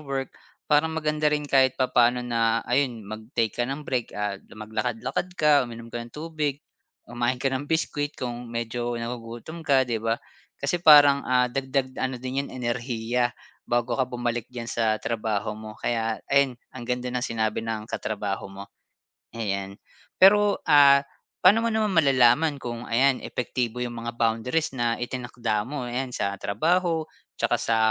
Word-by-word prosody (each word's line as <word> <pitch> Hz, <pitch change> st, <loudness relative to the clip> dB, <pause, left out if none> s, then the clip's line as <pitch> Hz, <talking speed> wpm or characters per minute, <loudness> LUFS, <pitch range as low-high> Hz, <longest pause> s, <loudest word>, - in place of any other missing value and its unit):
work, 135 Hz, -2 st, -4 dB, 0.4 s
para 150 Hz, +2 st, +5 dB
maganda 155 Hz, -1 st, -1 dB
rin 150 Hz, 0 st, 0 dB
kahit 130 Hz, -2 st, +3 dB
papaano 125 Hz, -1 st, +3 dB
na 115 Hz, -1 st, +1 dB
ayun 125 Hz, -3 st, 0 dB
mag-take 110 Hz, +2 st, -2 dB
ka 120 Hz, -, +1 dB
ng 140 Hz, +3 st, -4 dB
break 125 Hz, -5 st, -3 dB
at 105 Hz, -1 st, -3 dB
maglakad-lakad 110 Hz, +8 st, -3 dB
ka, 150 Hz, -1 st, +4 dB
uminom 115 Hz, 0 st, -9 dB
ka 120 Hz, -, -3 dB
ng 115 Hz, 0 st, -10 dB
tubig, 150 Hz, -2 st, -3 dB, 0.4 s
kumain 120 Hz, +1 st, -1 dB
ko 135 Hz, -, +2 dB
ng 135 Hz, +2 st, -2 dB
biscuit 150 Hz, -3 st, -1 dB
kung 120 Hz, -1 st, -5 dB
medyo 120 Hz, +1 st, -3 dB
nagugutom 120 Hz, +6 st, -6 dB
ka, 135 Hz, -4 st, +3 dB
'di 115 Hz, -3 st, -2 dB
ba? 115 Hz, +1 st, 0 dB, 0.4 s
Kasi 175 Hz, -, -1 dB
parang, 145 Hz, -3 st, +8 dB
ah, 125 Hz, -1 st, +2 dB
dagdag 135 Hz, -1 st, -2 dB
ano 130 Hz, -1 st, -1 dB
din 130 Hz, +2 st, -3 dB
'yan, -, -, -9 dB
enerhiya 120 Hz, -1 st, -1 dB, 0.4 s
bago 120 Hz, 0 st, +1 dB
ka 130 Hz, 0 st, 0 dB
bumalik 120 Hz, -1 st, -3 dB
diyan 120 Hz, -2 st, -7 dB
sa 110 Hz, -2 st, +1 dB
trabaho 110 Hz, -2 st, -2 dB
mo. 110 Hz, 0 st, -9 dB
Kaya 115 Hz, -2 st, -1 dB
ayun, 140 Hz, -3 st, +3 dB, 0.2 s
ang 120 Hz, -2 st, -8 dB
ganda 125 Hz, 0 st, -1 dB
ng 125 Hz, -1 st, -1 dB
sinabi 110 Hz, -2 st, -1 dB
ng 110 Hz, -1 st, -4 dB
katrabaho 100 Hz, -2 st, -3 dB
mo. 100 Hz, 0 st, -9 dB, 0.7 s
Ayan. 100 Hz, -3 st, -3 dB, 0.5 s
Pero, 205 Hz, +1 st, +6 dB
ah, 140 Hz, -2 st, +7 dB, 0.4 s
pa'no 210 Hz, +5 st, +6 dB
mo 230 Hz, -, +1 dB
naman 215 Hz, -3 st, 0 dB
malalaman 140 Hz, 0 st, +4 dB
kung 120 Hz, 0 st, -5 dB
ayan 130 Hz, +3 st, +3 dB
epektibo 125 Hz, -1 st, -3 dB
'yung 120 Hz, -1 st, -3 dB
mga 115 Hz, 0 st, -5 dB
boundaries 120 Hz, +7 st, 0 dB
na 120 Hz, -2 st, 0 dB
itinakda 120 Hz, -3 st, -2 dB
mo, 130 Hz, +1 st, -5 dB
ayan 125 Hz, +1 st, -3 dB
sa 100 Hz, -4 st, -2 dB
trabaho, 165 Hz, -, +1 dB, 0.3 s
tsaka -, -, +1 dB
sa 115 Hz, -, +1 dB
125 Hz, 160 wpm, -25 LUFS, 115-140 Hz, 0.7 s, parang